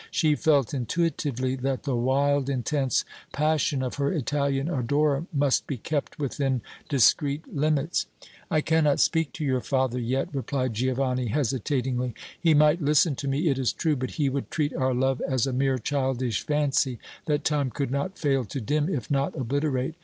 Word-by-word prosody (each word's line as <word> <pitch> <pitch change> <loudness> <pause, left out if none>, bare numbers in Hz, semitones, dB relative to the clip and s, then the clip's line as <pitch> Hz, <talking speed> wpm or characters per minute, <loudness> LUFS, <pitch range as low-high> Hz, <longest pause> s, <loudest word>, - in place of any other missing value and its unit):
She 155 -2 +2
felt 145 -4 +2
intuitively 130 -1 -1
that 130 0 -2
the 135 -4 -1
wild, 135 +3 +1
intense 135 +1 0 0.3
passion 150 -2 +1
of 125 - -4
her 140 0 +1
Italian 140 -2 0
adorer 145 +1 +1
must 140 -3 +1
be 140 - -3
kept 145 +7 -3
within 135 -3 -1 0.3
discreet 140 +3 +2
limits. 150 +2 +1 0.4
"I 155 - +2
cannot 155 -2 +2
speak 165 -3 +2
to 160 -4 -4
your 130 -2 +1
father 130 -2 0
yet," 125 +3 -1
replied 130 -2 -2
Giovanni, 130 +1 0
hesitatingly. 125 0 -1 0.3
"He 165 -3 +4
might 150 +3 +4
listen 150 +2 +3
to 140 - -4
me, 140 +5 0
it 135 -2 0
is 130 - +1
true; 155 -3 0
but 130 -1 -3
he 145 -3 +2
would 135 0 -2
treat 150 -3 -1
our 130 -1 0
love 130 +1 +1
as 130 -4 +1
a 135 - -2
mere 135 +1 +1
childish 130 -3 -1
fancy 145 -4 +1 0.3
that 150 -2 +1
time 145 -3 +1
could 135 +2 -3
not 140 +8 -2
fail 135 -4 +1
to 135 - -5
dim, 150 - 0
if 140 -10 -3
not 140 0 0
obliterate. 135 +2 -1
140 Hz, 170 wpm, -26 LUFS, 130-150 Hz, 0.4 s, He